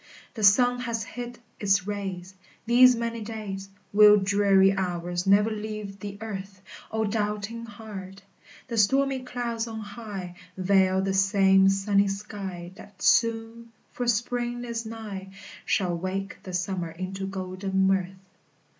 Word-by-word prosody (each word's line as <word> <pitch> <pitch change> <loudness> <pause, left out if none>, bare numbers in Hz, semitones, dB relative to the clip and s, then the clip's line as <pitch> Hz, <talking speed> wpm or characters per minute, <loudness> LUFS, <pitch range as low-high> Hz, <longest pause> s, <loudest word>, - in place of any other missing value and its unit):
The 220 - -5
sun 245 +5 +5
has 235 -3 -2
hid 245 +1 -7 0.2
its 195 -2 +2
rays 190 -3 -5 0.3
These 250 +2 +7
many 230 0 -3
days; 205 -3 -6 0.2
Will 210 0 +8
dreary 195 -1 +4
hours 175 -1 -2
never 205 +3 +5
leave 215 -2 -5
the 200 0 -7
earth? 195 -3 -6 0.3
O 220 0 0
doubting 210 +2 -2
heart! 195 -3 -9 0.4
The 230 -3 -1
stormy 270 +5 +3
clouds 240 -2 -3
on 220 -1 -6
high 205 -4 -7 0.2
Veil 190 0 +3
the 195 0 0
same 195 0 +5
sunny 200 +1 +2
sky 195 -3 -6
That 200 0 -13
soon, 230 0 +2 0.2
for 245 - -3
spring 240 +1 -1
is 230 -1 -4
nigh, 210 -4 -7 0.4
Shall 180 -4 +1
wake 190 +3 -4
the 185 -2 -9
summer 180 -1 -2
into 185 +3 -5
golden 190 0 -1
mirth. 190 -1 +1
200 Hz, 135 wpm, -26 LUFS, 190-225 Hz, 0.4 s, Will